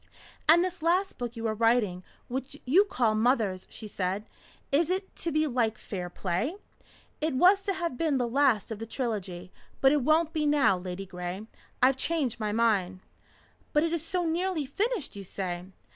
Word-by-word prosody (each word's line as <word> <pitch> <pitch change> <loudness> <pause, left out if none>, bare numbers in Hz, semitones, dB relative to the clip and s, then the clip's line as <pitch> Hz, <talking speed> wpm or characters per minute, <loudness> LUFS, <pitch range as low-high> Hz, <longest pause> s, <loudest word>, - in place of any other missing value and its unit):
"And 340 +2 +7
this 370 -2 -5
last 360 +2 +1
book 240 -1 -4
you 230 0 -5
are 220 - +1
writing, 220 -5 +2 0.2
which 265 +3 -5
you 350 +11 +5
call 245 - +1
'Mothers,'" 215 -5 +1
she 220 - -8
said. 195 +1 -2 0.5
"Is 310 +4 +3
it 380 +1 -2
to 335 - -2
be 310 0 +2
like 235 -6 0
'Fair 180 -3 -5
Play?'" 185 - -2 0.7
"It 310 -3 0
was 370 +8 +5
to 390 0 -1
have 340 -8 -3
been 310 -4 +2
the 245 -2 0
last 240 -4 +2
of 215 - -4
the 225 - -6
trilogy. 195 -8 -4 0.3
But 270 - +5
it 295 -1 +3
won't 315 +4 +2
be 305 -2 +1
now, 280 -10 +4
Ladygray. 180 +1 -6 0.4
I've 260 +1 +5
changed 270 -6 0
my 215 -1 -1
mind." 200 -5 +1 0.7
"But 300 - +4
it 330 0 0
is 330 -2 -1
so 350 +1 -1
nearly 335 -1 0
finished, 395 - -2
you 200 - -7
say?" 180 -2 -4
250 Hz, 180 wpm, -28 LUFS, 205-320 Hz, 0.7 s, And